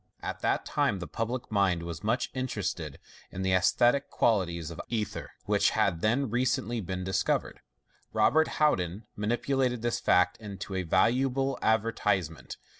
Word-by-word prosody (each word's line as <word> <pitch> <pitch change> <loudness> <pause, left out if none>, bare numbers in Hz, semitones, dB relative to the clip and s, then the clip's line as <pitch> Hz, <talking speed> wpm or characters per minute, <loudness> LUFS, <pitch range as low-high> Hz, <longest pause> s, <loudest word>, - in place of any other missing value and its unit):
At - - -4
that - - 0
time 100 - +1
the 90 - -5
public 115 +5 -4
mind 95 -5 +2
Was 85 +1 -6
much 115 +5 0
interested 100 - -3 0.3
in 95 - -5
the 95 - +1
anaesthetic 120 +9 +3
qualities 85 -7 0
of 85 - -6
ether, 110 -3 -3 0.2
which - - +3
had 85 -4 +1
then 120 +4 +1
recently 120 -2 0
been 95 0 -4
discovered. 95 0 -1 0.5
Robert 160 +5 +3
Houdin 100 - +1
manipulated 120 +3 0
this 120 0 0
fact 90 0 +3
into 100 -2 -7
a 95 - 0
valuable 135 +9 +1
advertisement. 105 -7 0
105 Hz, 140 wpm, -29 LUFS, 90-120 Hz, 0.5 s, anaesthetic